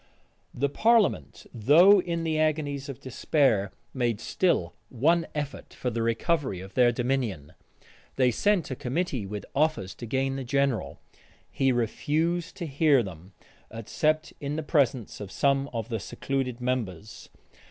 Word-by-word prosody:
The 140 +3 0
parliament, 205 - +2
though 165 - +6
in 170 -1 -3
the 160 -1 0
agonies 145 -3 -1
of 135 - -7
despair, 130 -6 +1 0.2
made 120 -5 0
still 115 - 0 0.2
one 160 +7 +2
effort 145 -2 -5
for 125 - -2
the 115 0 -2
recovery 115 - 0
of 95 +1 -10
their 125 -2 +4
dominion. 120 - -2 0.6
They 125 -2 +3
sent 195 - +1
a - - -2
committee 130 - -2
with 105 0 -6
offers 145 -10 0
to 120 - -5
gain 135 +3 -1
the 135 - -4
general. 135 - 0 0.5
He 135 -1 +2
refused 155 +9 -1
to 175 - -4
hear 140 -3 +3
them, 95 -1 -10 0.4
except 155 +8 -1
in 145 +1 -3
the 160 - -3
presence 135 - 0
of 100 -2 -7
some 140 +3 +1
of 115 -1 -4
the 115 -2 -2
secluded 130 +3 -3
members. 110 -6 -4
135 Hz, 145 wpm, -27 LUFS, 115-155 Hz, 0.6 s, though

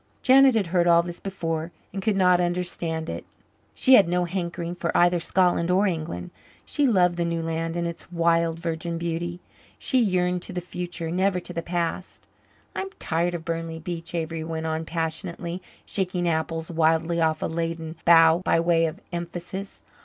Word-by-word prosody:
Janet 265 -1 +6
had 215 -3 +2
heard 175 -1 +3
all 170 0 +6
this 175 0 -7
before 165 -4 -3 0.2
and 195 - -3
could 215 0 +1
not 180 -2 +4
understand 175 -2 -2
it. - - -5 0.5
She 260 - +5
had 200 -8 +7
no 180 0 +1
hankering 170 -1 -3
for 170 -1 -3
either 175 0 +4
Scotland 175 0 +2
or 190 +3 +3
England. 155 - -3 0.3
She 290 -2 +1
loved 180 -6 +3
the 170 - +1
new 170 -1 -1
land 165 0 -2
and 170 0 -1
its 170 +1 -7
wild, 170 -1 +2
virgin 170 0 -3
beauty. 170 +1 -3 0.4
She 260 - +1
yearned 180 -4 +1
to - - -5
the 180 - -2
future, 175 -1 -5
never 185 +1 +1
to 175 - -9
the 170 - -2
past. 170 +1 -3 0.5
"I'm 385 - -3
tired 175 +2 0
of 165 -1 -6
Burnley 165 -1 -3
Beach," 170 +1 -6
Avery 165 -1 -3
went 160 0 -4
on 160 0 -2
passionately, 170 +2 -4 0.2
shaking 180 -2 -1
apples 160 0 -1
wildly 165 +1 +2
off 160 -1 +1
a - - +1
laden 165 0 -3
bough 165 0 +6
by 165 - +3
way 165 -1 +3
of 160 +4 -6
emphasis. 175 +3 -6
170 Hz, 175 wpm, -25 LUFS, 165-180 Hz, 0.5 s, had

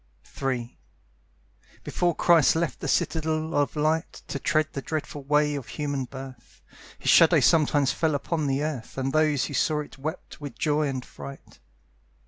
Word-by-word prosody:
III 125 -3 -2 1.0
Before 175 -2 0
Christ 165 -5 +5
left 165 -1 -1
the - - -4
Citadel 160 0 0
of 145 +1 +1
Light, 155 +2 -1
To 140 - -3
tread 155 +1 +1
the 140 - -4
dreadful 150 -1 -4
way 150 +1 +2
of 140 -3 -5
human 145 -3 -3
birth, 130 -1 -11 0.3
His - - +1
shadow - - +7
sometimes 145 -3 +3
fell 160 -2 0
upon 155 +1 -1
the 135 +1 0
earth 145 -7 -5
And 135 0 -1
those 155 -3 +2
who - - -6
saw 150 -1 +1
it 135 -2 -11
wept 155 +1 -6
with 145 -1 -7
joy 150 -1 +1
and 130 -2 -4
fright. 140 0 -11
150 Hz, 160 wpm, -26 LUFS, 135-155 Hz, 1.0 s, shadow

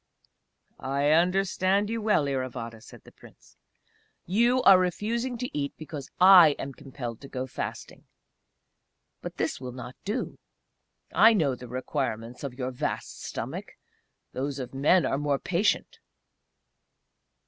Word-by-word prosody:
"I 140 +2 0
understand 190 +4 +2
you 230 0 -2
well, 210 -8 +2
Iravata," 125 -4 -4
said - - -14
the - - -16
Prince. - - -19 0.7
"You 235 +7 +2
are 190 -1 +8
refusing 230 +7 -1
to 250 -6 -5
eat 140 -1 -2
because 155 -3 -8
I 180 -5 +8
am 140 - -6
compelled 125 -4 -8
to 140 - -10
go 130 -1 -4
fasting. 130 - -7 1.2
But - - -7
this - - -2
will 125 -1 -6
not 125 0 -9
do. 210 +6 -4 0.7
I 225 +1 +7
know 155 -10 +2
the 125 0 -9
requirements 125 -2 -4
of 135 -3 -5
your 130 0 -3
vast 125 - -4
stomach - - -6 0.6
those 135 +2 -3
of 130 -1 -6
men 150 +6 +3
are 135 - 0
more 145 -1 0
patient!" 205 - 0
145 Hz, 135 wpm, -27 LUFS, 130-195 Hz, 1.2 s, are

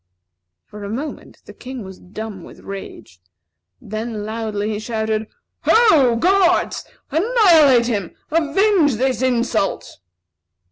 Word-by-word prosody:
For 210 0 -11
a 200 - -5
moment, 270 +8 -7
the - - -12
King 255 -2 -8
was 190 -1 -11
dumb 205 0 -8
with - - -14
rage. 190 - -10 0.6
Then 215 0 -5
loudly 215 -1 -3
he 210 - -3
shouted: 220 -1 -2 0.4
"Ho, 315 - +5
guards! 360 +7 +2 0.3
Annihilate 325 - +5
him! 205 -7 -3 0.2
Avenge 330 - +2
this 260 +2 -1
insult!" 235 - -1
235 Hz, 110 wpm, -20 LUFS, 215-310 Hz, 0.6 s, Ho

